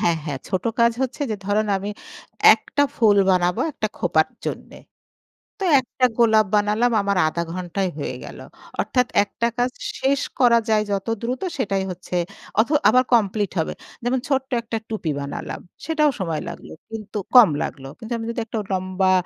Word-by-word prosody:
হ্যাঁ, 170 -1 +2
হ্যাঁ, 145 -4 -3
ছোট 185 -1 -2 0.2
কাজ 235 0 +5
হচ্ছে 265 +3 -3
যে, 215 - -1
ধরুন 210 +2 +1
আমি, 200 +2 -4 0.6
একটা 285 - -1
ফুল 210 -3 +4
বানাবো 180 -1 +2
একটা - - -2
খোঁপার - - +2 0.2
জন্যে। - - -6 0.8
তো - - -1 0.2
একটা 255 +1 -2
গোলাপ 220 -2 +5
বানালাম 210 +3 +2
আমার 200 -1 0
০.৫ 170 +2 -2
ঘণ্টাই 185 +1 -2
হয়ে 145 - -4
গেল। - - -9 0.4
অর্থাৎ 250 -1 +1 0.2
একটা 235 +3 -2
কাজ 245 +1 +2 0.3
শেষ 275 +1 +2 0.2
করা 235 -2 +6
যায় 215 -1 +4
যত 195 +2 -2 0.2
দ্রুত 250 +5 -3 0.2
সেটাই 195 -5 0
হচ্ছে। 180 0 -5 0.4
অথ 225 - +2 0.2
আবার 255 +3 +5
কমপ্লিট 205 -2 +2
হবে। - - -2 0.3
যেমন 250 +1 +1
ছোট্ট 270 -1 0
একটা 230 0 -4
টুপি 205 -8 -2
বানালাম। 140 0 -5 0.3
সেটাও 305 -2 +3
সময় 165 -5 -2
লাগল। - - -9 0.2
কিন্তু 215 -1 -6 0.2
কম 225 -9 +9
লাগলো। 135 -1 -5
কিন্তু 225 0 -7
আমি 225 - -5
যদি 235 - -3
একটা 225 0 -4
লম্বা 185 0 +1
215 Hz, 165 wpm, -22 LUFS, 185-240 Hz, 0.8 s, কম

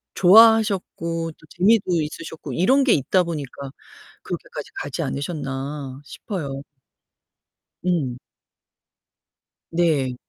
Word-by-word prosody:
좋아하셨고 190 -5 +4
또 - - -22 0.2
재미도 185 -3 +3
있으셨고 155 +1 -6
이런 265 +11 +3
게 260 - +4
있다 170 +6 +2
보니까 145 -5 -6 0.5
그렇게까지 - - -7
가지 - - -4
않으셨나 140 -2 -4
싶어요. 140 -7 -6 1.2
응. 155 -9 0 1.5
네. 155 -7 +1
165 Hz, 215 characters per minute, -22 LUFS, 140-185 Hz, 1.5 s, 좋아하셨고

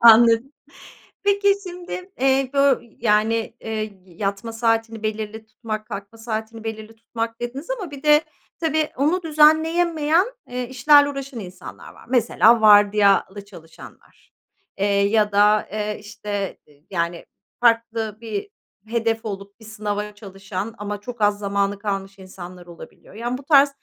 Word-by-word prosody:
Anladım. 230 +3 +7 0.7
Peki, 400 0 +3
şimdi, 360 +1 -7
eee, 265 0 +2
bö 275 -2 +3
y 235 - -22
yani, 225 +1 +1
eee, - - -7 0.4
y 180 - -18
yatma 200 +2 -3
saatini 225 -1 0
belirli 215 0 -4
tutmak, 215 0 -6
kalkma 200 +3 -8
saatini 225 0 -5
belirli 220 0 -7
tutmak 230 0 -5
dediniz 265 +7 -5
ama 350 -7 -6
bir 280 0 -10
de 300 0 +6 0.4
tabii, 315 -2 0
onu 325 +7 +1
düzenleyemeyen, 320 +2 +3 0.2
eee, 245 0 -4
işlerle 285 +3 +5
uğraşan 275 -3 -6
insanlar 185 -2 -10
var. - - -17
Mesela 235 -2 +4
vardiyalı 205 -1 +5
çalışanlar, 165 -5 -15 0.5
eee, 200 - 0
ya 205 +1 +2
da, 210 +1 +4
eee, 210 0 -3
işte, 205 -2 -5
ııı, 145 - -22
yani, 170 -2 -2 0.3
farklı 230 -2 +1
bir 220 - -5 0.4
hedef 225 -1 -1
olup 200 0 -7
bir 220 - -15
sınava 210 -1 -4
çalışan 200 +1 -6
ama 205 0 -5
çok 240 +1 -8
az 205 0 +3
zamanı 200 0 -1
kalmış 195 -1 -4
insanlar 180 -1 -11
olabiliyor. 175 +2 -14
Yani, 240 +3 -3
bu 275 - -12
tarz 285 -1 +6
225 Hz, 140 wpm, -22 LUFS, 205-260 Hz, 0.7 s, Anladım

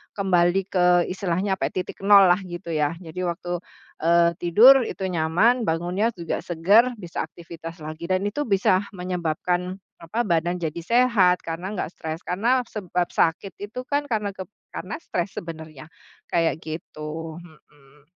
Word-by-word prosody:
kembali 180 -2 +2
ke 180 -2 +3 0.3
istilahnya 190 +1 -1
apa - - +1
ya, - - -8
titik - - -11
nol 195 -2 +7
lah 180 - +3
gitu 175 -1 -7
ya, 150 0 0
jadi 175 +2 -4
waktu, 175 +1 -3 0.4
eee, 170 +1 +4
tidur 215 +10 +7
itu - - -7
nyaman, 185 +9 +2
bangunnya 175 +7 0
juga 170 -4 -3
segar 200 +9 +4
bisa 175 -4 -4
aktivitas 165 0 -10
lagi 155 +2 -7
dan 185 0 +2
itu 255 +9 -2
bisa 195 -2 +2
menyebabkan 180 0 -2 0.2
apa, 170 +8 -2
badan 175 0 +1
jadi 160 0 -3
sehat 215 -3 +3
karena 170 +4 -4
nggak - - -2
stres, 160 0 -5
karena 230 +8 +2
sebab 180 -4 -2
sakit 175 +4 0
itu 210 +5 -5
kan 290 0 0
kep 200 -4 -3 0.2
karena - - -5
stres 180 +2 -2
sebenarnya, 160 -4 -8 0.4
kayak 165 -2 +1
gitu, 155 0 -6
mhm. 150 -4 -20
175 Hz, 150 wpm, -24 LUFS, 165-195 Hz, 0.4 s, nol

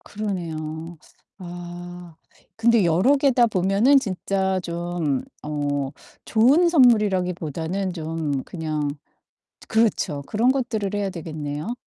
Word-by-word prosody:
그러네요. 165 -5 -5 0.4
아 175 -1 -9 0.4
근데 230 -2 +4
여러 185 - +4
개다 265 -4 +4
보면은 205 +7 +4
진짜 190 -4 -1
좀 170 -5 -2 0.2
어 145 -2 -2 0.3
좋은 270 +11 +4
선물이라기보다는 190 - +2
좀 160 -4 -3
그냥 155 -3 -3 0.8
그렇죠. 220 -10 +1
그런 235 +4 +2
것들을 230 -7 -2
해야 205 -1 -1
되겠네요. 155 +1 -5
180 Hz, 230 characters per minute, -23 LUFS, 160-215 Hz, 0.8 s, 근데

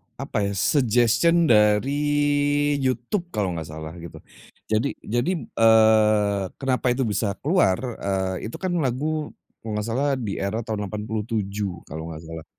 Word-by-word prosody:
Apa - - -3
ya, 100 - -3
suggestion 120 - +3
dari 110 +3 +3 0.8
YouTube 130 - -1
kalau 100 -4 0
enggak 80 -2 -5
salah 80 0 -7
gitu. 85 0 -10 0.6
Jadi 110 +6 +1
jadi, 120 - -1
eee, 110 -3 +4
kenapa 130 -2 -1
itu 125 +2 +1
bisa 105 -2 -1
keluar, 145 - +3 0.2
eee, 95 0 -2
itu - - -8
kan 185 -1 -3
lagu 150 +3 -2 0.2
kalau 110 - -7
enggak 105 +1 -2
salah 140 +5 0
di 110 -6 -4
era 110 +4 -2
tahun 105 -2 -3
87 105 -3 -3
kalau 80 +2 -7
enggak 80 0 -8
salah, 80 -1 -7
110 Hz, 145 wpm, -24 LUFS, 100-130 Hz, 0.8 s, eee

